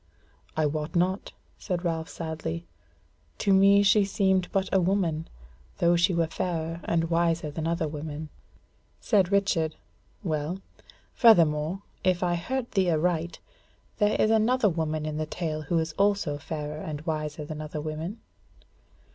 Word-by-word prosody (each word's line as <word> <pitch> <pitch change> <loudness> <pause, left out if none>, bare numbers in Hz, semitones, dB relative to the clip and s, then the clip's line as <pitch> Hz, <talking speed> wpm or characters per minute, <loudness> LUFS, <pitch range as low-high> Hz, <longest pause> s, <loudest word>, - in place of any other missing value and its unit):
"I 155 - +3
wot 150 +3 -2
not," 185 +3 0 0.3
said 180 -2 -3
Ralph 165 -1 -1
sadly; 155 - -5 0.7
"to 195 - +2
me 200 +1 +6
she 205 +1 +5
seemed 190 -2 +1
but 195 -1 +1
a 190 - +5
woman, 170 -4 0 0.5
though 170 0 +4
she 175 +3 +3
were 170 -1 +2
fairer 165 0 -3
and 165 0 0
wiser 165 -2 +1
than 160 +2 -3
other 170 -1 0
women." 150 0 -6 0.7
Said 195 -5 +2
Richard: 170 -6 +1 0.5
"Well, 160 +1 -2 0.5
furthermore, 170 -4 +4 0.2
if 185 -1 +2
I 175 -1 +1
heard 240 +9 -3
thee 190 -3 +2
aright, 170 +1 0 0.6
there 210 -1 +2
is 215 - +4
another 225 +1 +3
woman 155 -2 -2
in 155 -1 -3
the 155 0 -2
tale 155 -2 -3
who 160 +3 -1
is 160 -1 -1
also 200 -7 +2
fairer 150 0 -5
and 150 -2 -5
wiser 155 -1 -3
than 155 0 -6
other 155 0 -5
women?" 155 +7 -5
165 Hz, 145 wpm, -27 LUFS, 155-190 Hz, 0.7 s, me